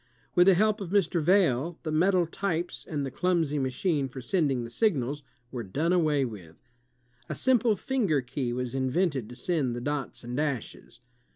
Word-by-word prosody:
With 175 0 +5
the 195 - +7
help 215 +2 +2
of 190 - -5
Mr. 185 -3 +2
Vail, 170 -3 +2
the 155 - -3
metal 180 +3 +3
tj^es 175 0 -3
and 145 -3 -2
the 135 - -5
clumsy 165 -4 0
machme 135 +2 0
for 130 - -8
sending 135 -2 0
the 115 - -8
signals 145 - 0 0.3
were 125 - -4
done 145 - -1
away 155 -6 +2
with. 95 -9 -9 0.7
A - - -3
simple 240 -4 +3
finger 200 - 0
key 125 0 -3
was 125 0 -3
invented 135 - 0
to 125 - -9
send 135 -3 0
the 120 - -5
dots 145 -1 -3
and 120 +1 -5
dashes. 140 -5 -4
150 Hz, 175 wpm, -28 LUFS, 130-180 Hz, 0.7 s, the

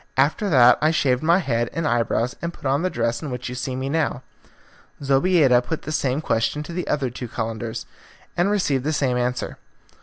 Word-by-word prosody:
After 150 +10 +2
that 125 -6 +6
I 155 - +4
shaved 130 -6 +1
my 170 +3 +4
head 120 -9 0
and 165 -1 -1
eyebrows 120 0 0
and 170 - -3
put 170 - -15
on 135 +3 +2
the 185 - 0
dress 115 -4 -1
in 150 - -5
which 125 -1 -5
you - - -5
see 125 +1 -4
me 130 +1 -3
now." 145 -3 -1 0.8
Zobeida 135 -2 +4
put 160 +5 -4
the 155 - -5
same 140 -2 0
question 115 +3 0
to 170 - -8
the 180 +1 -3
other 135 -4 0
two 125 0 -6
Calenders, 115 0 -4 0.5
and 175 +3 +2
received 150 -11 +1
the 155 +2 -1
same 135 -4 +1
answer. 125 0 -2
135 Hz, 205 wpm, -23 LUFS, 125-155 Hz, 0.8 s, that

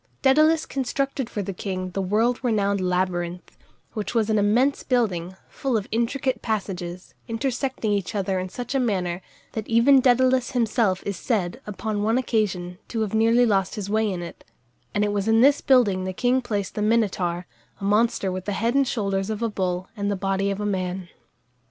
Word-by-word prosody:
Dædalus 310 +4 +4
constructed 275 -1 -2
for 205 - -3
the 195 - -4
king 185 0 -4
the 195 - -2
world 220 +6 +1
renowned 200 -4 +1
labyrinth, 180 -1 -2 0.4
which 215 +2 -4
was 225 -1 +2
an 215 - +3
immense 240 +7 +2
building, 190 -8 0
full 265 -4 -1
of 205 - -4
intricate 250 +3 0
passages, 185 -5 -4
intersecting 245 -1 -2
each 200 0 -2
other 190 -2 0
in 185 0 -4
such 245 +7 -5
a 270 - +2
manner, 185 -7 -1 0.3
that 220 -1 -5
even 250 +4 +5
Dædalus 255 0 +3
himself 225 -5 +1
is 200 -3 -3
said, 215 +1 -1
upon 210 0 -3
one 220 +3 +2
occasion, 190 -8 -1
to 225 - -3
have 215 -2 -2
nearly 230 +2 +4
lost 195 -4 +1
his 200 -1 -5
way 220 0 +2
in 175 -2 -4
it; 170 - -10 0.5
and 205 - +1
it 205 - 0
was 200 0 -1
in 225 0 +4
this 280 +2 +5
building 215 -8 +3
the 185 0 -3
king 250 +5 +1
placed 205 -5 -3
the 210 - -3
Minotaur, 195 -5 +1 0.3
a - - -10
monster 205 -1 +2
with 185 0 -5
the 205 - -2
head 230 +4 0
and 275 -1 +3
shoulders 195 -4 -1
of 220 +1 -3
a 230 - +1
bull 185 -2 -2
and 200 -1 -2
the 200 - 0
body 195 +1 0
of 200 0 -2
a 210 - -2
man. 185 -2 -2
210 Hz, 190 wpm, -24 LUFS, 190-240 Hz, 0.5 s, even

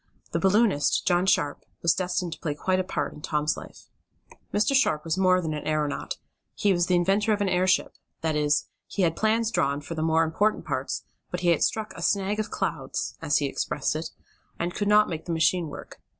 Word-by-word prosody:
The - - 0
balloonist, 195 -5 +3
John 180 0 +2
Sharp, 145 -6 +1 0.2
was 170 - +5
destined 180 -2 -2
to - - -11
play 150 -3 -3
quite 185 +5 0
a - - +1
part 185 - -3
in 150 - -12
Tom's 150 0 0
life. - - -11 0.7
Mr. 210 +6 +2
Sharp 155 - +2
was 160 - 0
more 185 -1 +4
than 160 -2 -2
an 150 - -5
aeronaut 150 -2 -1 0.4
he 200 -1 +2
was 175 -1 +1
the 180 - +3
inventor 195 +5 +2
of 210 - -1
an 205 - +1
airship 185 +1 +2 0.3
that 160 -1 0
is, 150 -1 +2 0.2
he 195 - -1
had 165 -2 +2
plans 220 +1 +1
drawn 140 -8 +1
for 145 +3 -7
the 160 - -3
more 160 0 +3
important 205 +7 0
parts, - - -3 0.3
but 180 - -4
he 175 - +2
had 170 - +3
struck 220 -1 0
a - - -9
"snag 200 +1 +1
of 215 - -2
clouds," - - -3
as - - +2
he - - 0
expressed - - -1
it, - - -3 0.5
and 175 +1 -2
could 205 - -1
not 210 +1 +5
make 160 -2 -5
the 170 - -2
machine 165 +1 +2
work. 145 - -10
180 Hz, 215 wpm, -26 LUFS, 160-200 Hz, 0.7 s, was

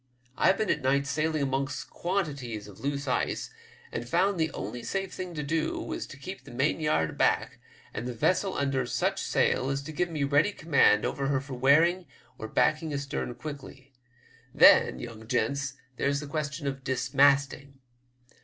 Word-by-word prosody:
I've 190 - +3
been 215 - +1
at 150 - -1
night 140 +1 +2
sailing 155 +1 0
amongst 135 0 -2
quantities 140 - -3
of 100 - -13
loose' 140 0 -3
ice, 125 - -1 0.4
and 120 +1 -5
found 185 +3 +2
the 160 0 +1
only 120 - -6
safe 195 +6 -3
thing 180 -2 -6
to 150 - -3
do 155 +2 -1
was - - -5
to 140 - -11
keep 185 +8 -8
the - - -13
mainyard 140 - +1
aback, - - +1 0.3
and 120 - -4
the 125 - -5
vessel 185 - +1
under 135 -3 0
such - - 0
sail 130 - +1
as 135 0 -2
to 155 - -7
give 175 +3 -1
me 155 -3 -2
ready 145 +8 +3
command 140 - +3
over 135 -1 -2
her 140 -1 +1
for 140 0 -8
wearing 160 +8 +3 0.3
or 110 - -5
backing 155 +7 +1
astern 140 -3 -3
quickly. 140 -2 -9 0.6
Then, - - +7
young 110 -2 -9
gents, 140 +3 -1 0.2
there's 140 0 +1
the 150 - -6
question 150 0 -4
of 135 -1 -3
dismasting. 135 +2 +2
140 Hz, 170 wpm, -28 LUFS, 130-155 Hz, 0.6 s, Then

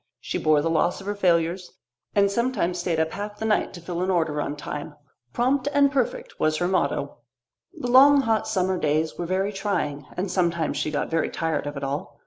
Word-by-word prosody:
She - - -3
bore 155 -1 +3
the 165 - +1
loss 165 +2 +1
of 195 - -11
her 205 - -1
failures, 175 -2 +1 0.4
and 200 -1 +4
sometimes 210 -7 0
stayed 170 -2 -1
up 160 0 +1
half 205 +1 -5
of - - -23
the 220 - -4
night 215 -1 +1
to 175 - -9
fill 175 +1 -4
an 185 - 0
order 160 -5 +1
on 145 - -3
time. 150 0 -6 0.4
"Prompt 255 - +1
and 280 -1 +5
perfect" 265 -4 -2
was 155 0 +2
her 175 - 0
motto. 185 0 -1 0.6
The - - -5
long 275 +3 +7
hot 225 -4 0
summer 190 -3 0
days 155 +1 0
were 175 - -2
very 190 +3 0
trying, 175 -9 -2
and 185 +1 -2
sometimes 170 -3 0
she - - -1
got 150 +1 -2
very 165 0 +1
tired 160 -3 -2
of 145 0 -5
it 140 - -5
all. 140 +2 -4
180 Hz, 215 wpm, -24 LUFS, 160-205 Hz, 0.6 s, long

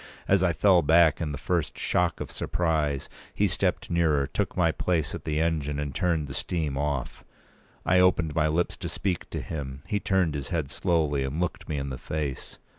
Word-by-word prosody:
As - - +4
I - - +3
fell 95 -4 +4
back 80 +1 +4
in 80 -3 -1
the 75 - -4
first 85 +1 -1
shock 90 -1 +1
of - - -5
surprise, 75 -5 -1 0.3
he - - +3
stepped - - -1
nearer; 80 -5 +2
took 70 - -3
my - - +4
place 80 -5 -1
at - - -6
p. 75 - -2
217the 80 - +2
engine, 75 -3 -1
and 75 -2 -3
turned 85 -2 0
the 65 - -7
steam 75 0 -2
off. 70 -2 -2 0.6
I 90 +1 +4
opened 90 -4 +3
my 80 0 +2
lips 80 +3 0
to - - -5
speak 95 -3 -2
to - - -4
him; 70 -4 -6
he 105 - -1
turned 95 -6 +1
his 70 -2 -4
head 80 -6 -2
slowly, 75 -7 +1
and 65 +4 -3
looked 90 -1 -3
me 75 - -1
in 70 0 -3
the 65 - -5
face. 75 -2 -4
80 Hz, 205 wpm, -27 LUFS, 70-85 Hz, 0.6 s, As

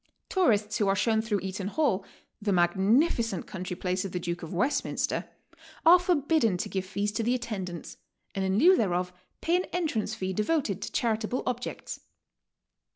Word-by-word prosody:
Tourists 215 - +2
who 205 - +2
are 195 - +3
shown 220 +2 +2
through 215 -3 -1
Eaton 190 0 -4
Hall, 210 -5 +1 0.4
the 205 -1 0
magnificent 195 - +2
country 185 -3 -5
place 185 0 -1
of 195 - -5
the 180 - -2
Duke 175 0 -3
of 165 - -7
West 250 +11 +1
minster, - - -2 0.6
are 350 +2 +9
forbidden 305 - +2
to - - -3
give 190 -1 -3
fees 205 +2 -1
to 215 - -2
the 240 +3 +1
attendants, 195 -8 -5 0.4
and 195 - -1
in 190 +1 +1
lieu 360 - +7
thereof 180 - 0 0.3
pay 335 - +2
an 365 - -1
entrance 315 -11 -2
fee 190 0 -3
devoted 210 - 0
to - - -5
charitable 225 +1 0
objects. 250 0 -4
210 Hz, 170 wpm, -28 LUFS, 190-250 Hz, 0.6 s, are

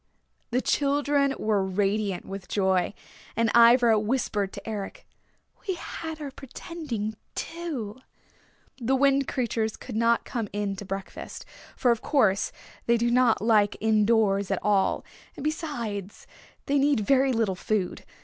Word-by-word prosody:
The 250 +2 0
children 285 -1 +2
were 210 -2 +1
radiant 195 0 -1
with 195 -1 -7
joy. 190 -1 +1 0.4
And 230 -1 +2
Ivra 235 -1 +6
whispered 210 -3 -1
to - - -9
Eric, 210 -3 -5 0.6
"We 380 - 0
had 320 -2 -6
our 290 -2 -5
pretending, 270 -5 -5 0.2
too!" 280 -10 -5 0.8
The 255 +2 +1
Wind 275 0 +3
Creatures 225 -4 -1
would 245 - -6
not 230 +1 +2
come 230 -3 -3
in 205 -1 -2
to 205 - -7
breakfast, 195 0 -6 0.3
for 245 - +3
of 230 - 0
course 210 -9 +2 0.4
they 235 0 +4
do 235 +1 +1
not 240 -4 +3
like 215 -2 +4
in 215 -1 +2
doors 200 -4 +2
at 195 - +1
all, 200 -2 +2 0.3
and - - -6
besides, 235 - -4 0.4
they 280 0 +2
need 280 -4 +3
very 265 +4 +3
little 225 -5 +1
food. 185 0 -2
225 Hz, 140 wpm, -26 LUFS, 205-270 Hz, 0.8 s, Ivra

